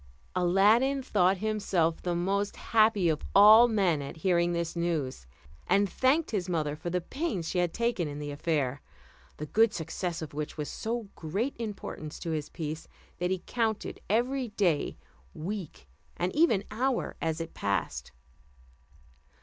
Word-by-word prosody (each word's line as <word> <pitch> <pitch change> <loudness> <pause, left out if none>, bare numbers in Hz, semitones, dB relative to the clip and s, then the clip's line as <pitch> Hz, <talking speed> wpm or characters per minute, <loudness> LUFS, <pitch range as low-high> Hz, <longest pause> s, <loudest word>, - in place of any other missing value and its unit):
Aladdin 210 +10 +3
thought 190 -5 +3
himself 195 -6 0
the 175 -1 -1
most 200 +4 0
happy 215 -4 +3
of 155 -2 +1
all 215 +4 +9
men 190 -9 +2
at 140 +3 -7
hearing 175 -2 +3
this 170 -1 -2
news, 155 - -2 0.4
and 200 0 +3
thanked 270 - +1
his 190 -4 -2
mother 155 -4 -1
for 175 - -5
the 180 +1 -1
pains 210 - -3
she 180 - -1
had 175 -1 +1
taken 235 -5 0
in 145 0 -6
the 145 0 -5
affair, 145 -3 -1 0.6
the 150 - -4
good 220 +7 +3
success 170 +1 -3
of 155 - -8
which 150 +1 -5
was 150 -1 -3
of - - -7
so 225 -2 -3
great 200 - -3
importance 205 -8 -6
to 165 - -4
his 155 -2 -3
peace, 155 0 -5 0.3
that 180 0 0
he 185 -1 -2
counted 225 -3 -2
every 250 +4 +1
day, 190 -8 0 0.4
week, 165 - -6 0.3
and 180 +1 -1
even 290 - +4
hour 250 +4 -1
as 160 0 -1
it 165 0 -5
passed. 100 -1 -2
180 Hz, 160 wpm, -29 LUFS, 160-215 Hz, 0.6 s, all